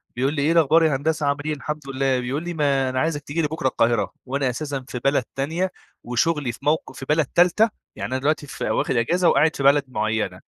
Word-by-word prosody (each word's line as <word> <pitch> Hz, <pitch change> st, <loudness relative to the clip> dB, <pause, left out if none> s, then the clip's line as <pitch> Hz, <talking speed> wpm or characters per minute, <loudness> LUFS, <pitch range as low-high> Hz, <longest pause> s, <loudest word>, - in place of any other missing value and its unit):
بيقول 135 Hz, +4 st, 0 dB
لي: 145 Hz, -, -1 dB
"إيه 150 Hz, -, +2 dB
الأخبار 165 Hz, 0 st, +4 dB
يا 155 Hz, -4 st, +3 dB
هندسة 155 Hz, +2 st, -1 dB
عامل 140 Hz, 0 st, 0 dB
إيه؟"، 155 Hz, -, 0 dB
"الحمد 150 Hz, +1 st, -6 dB
لله"، 135 Hz, -1 st, +1 dB
بيقول 130 Hz, +5 st, -3 dB
لي: 175 Hz, 0 st, -4 dB
"ما 140 Hz, -4 st, +1 dB
أنا 130 Hz, 0 st, -1 dB
عايزك 155 Hz, -1 st, 0 dB
تيجي 160 Hz, +4 st, -2 dB
لي 150 Hz, -, +1 dB
بُكرة 150 Hz, -3 st, -2 dB
القاهرة."، 120 Hz, -2 st, +1 dB
وأنا 135 Hz, 0 st, -1 dB
أساسًا 135 Hz, 0 st, -4 dB
في 125 Hz, -, -5 dB
بلد 140 Hz, -2 st, +2 dB
تانية 165 Hz, +7 st, -1 dB, 0.3 s
وشغلي 130 Hz, +2 st, 0 dB
في -, -, -13 dB
موق 155 Hz, +2 st, 0 dB
في 135 Hz, -, -9 dB
بلد 155 Hz, 0 st, +3 dB
تالتة، 180 Hz, -, +3 dB, 0.3 s
يعني -, -, -5 dB
أنا 130 Hz, -, 0 dB
دلوقتي 150 Hz, +1 st, 0 dB
في -, -, -4 dB
واخد 130 Hz, -, 0 dB
أجازة 170 Hz, +10 st, +2 dB
وقاعد 155 Hz, +3 st, +3 dB
في 140 Hz, -, -3 dB
بلد 140 Hz, +1 st, +5 dB
معينة، 110 Hz, -5 st, -2 dB
140 Hz, 230 wpm, -23 LUFS, 130-155 Hz, 0.3 s, بلد